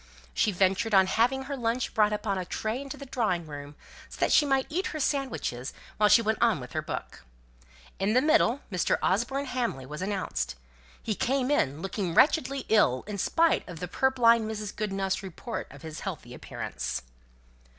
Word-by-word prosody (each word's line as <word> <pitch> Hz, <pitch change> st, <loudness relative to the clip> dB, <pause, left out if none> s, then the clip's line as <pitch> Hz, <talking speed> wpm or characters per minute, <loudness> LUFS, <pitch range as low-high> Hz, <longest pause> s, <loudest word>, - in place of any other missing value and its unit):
She 210 Hz, -, +2 dB
ventured 195 Hz, +3 st, +2 dB
on 190 Hz, -1 st, +7 dB
having 245 Hz, +7 st, +1 dB
her 280 Hz, +1 st, -4 dB
lunch 240 Hz, 0 st, -1 dB
brought 210 Hz, -1 st, +3 dB
upon 210 Hz, -2 st, -1 dB
a -, -, -2 dB
tray 220 Hz, +7 st, -3 dB
into 275 Hz, -1 st, -7 dB
the 280 Hz, -, -8 dB
drawing 215 Hz, -10 st, -1 dB
room, 145 Hz, -1 st, -8 dB, 0.3 s
so -, -, -10 dB
that -, -, +2 dB
she 295 Hz, -, +5 dB
might 270 Hz, -1 st, +2 dB
eat 360 Hz, +5 st, -2 dB
her 310 Hz, -, -5 dB
sandwiches 260 Hz, -, -2 dB, 0.2 s
while 210 Hz, -1 st, +4 dB
she 230 Hz, +3 st, +6 dB
went 220 Hz, 0 st, 0 dB
on 230 Hz, -8 st, +3 dB
with 125 Hz, -1 st, -9 dB
her -, -, -1 dB
book. -, -, -6 dB, 0.8 s
In 195 Hz, +3 st, +1 dB
the 250 Hz, -, +5 dB
middle, 280 Hz, -3 st, +3 dB
Mr. 180 Hz, -2 st, +1 dB
Osborne 240 Hz, +8 st, +1 dB
Hamley 245 Hz, -, -2 dB
was 150 Hz, +4 st, -7 dB
announced. 185 Hz, -, -2 dB, 0.5 s
He 220 Hz, -, -1 dB
came 260 Hz, +5 st, 0 dB
in, 150 Hz, -, +1 dB
looking 190 Hz, -3 st, -2 dB
wretchedly 275 Hz, -2 st, +3 dB
ill 130 Hz, -, +3 dB
in 205 Hz, -1 st, -5 dB
spite 330 Hz, -, +2 dB
of 175 Hz, -, -7 dB
purblind 235 Hz, -4 st, +3 dB
Mrs. 210 Hz, -1 st, -5 dB
Goodenough's 195 Hz, -2 st, -1 dB
report 190 Hz, -3 st, -6 dB
of 140 Hz, 0 st, -13 dB
his 160 Hz, -1 st, -7 dB
healthy -, -, -6 dB
appearance. 65 Hz, +2 st, -5 dB
215 Hz, 180 wpm, -28 LUFS, 185-260 Hz, 0.8 s, on